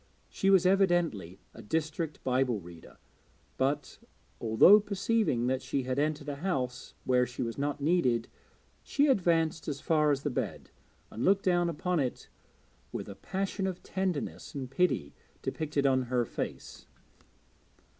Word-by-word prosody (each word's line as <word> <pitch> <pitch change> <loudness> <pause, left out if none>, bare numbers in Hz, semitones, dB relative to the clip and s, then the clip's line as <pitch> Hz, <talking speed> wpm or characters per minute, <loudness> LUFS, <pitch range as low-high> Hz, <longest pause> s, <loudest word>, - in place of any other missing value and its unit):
She 195 - 0
was 190 -2 +5
evidently 175 - +2 0.2
a - - -11
district 160 +4 -3
Bible 125 -3 +1
reader, 85 -2 -13 0.6
but, 140 +1 -1 0.4
although 115 - +7
perceiving 200 - 0
that 130 +1 0
she 135 - -2
had 130 +2 -1
entered 150 0 -1
a 140 - -4
house 130 -7 -3
where 125 -1 +3
she 125 +2 -4
was 115 -1 -3
not 145 +1 -2
needed, 140 -8 +2 0.5
she 285 - +1
advanced 170 - +2
as 140 -2 -3
far 150 0 +2
as 140 -1 0
the 145 - -1
bed - - -4 0.4
and 115 - -4
looked 195 +1 +3
down 175 -2 +3
upon 175 +2 -1
it 130 -3 -3 0.6
with - - -5
a 100 - -8
passion 195 - -3
of 185 -1 -5
tenderness 185 -7 -3
and 130 -2 -5
pity 135 - +1 0.3
depicted 150 -3 -1
on 130 -1 +4
her 120 -1 0
face. - - -6
150 Hz, 145 wpm, -30 LUFS, 130-180 Hz, 0.6 s, although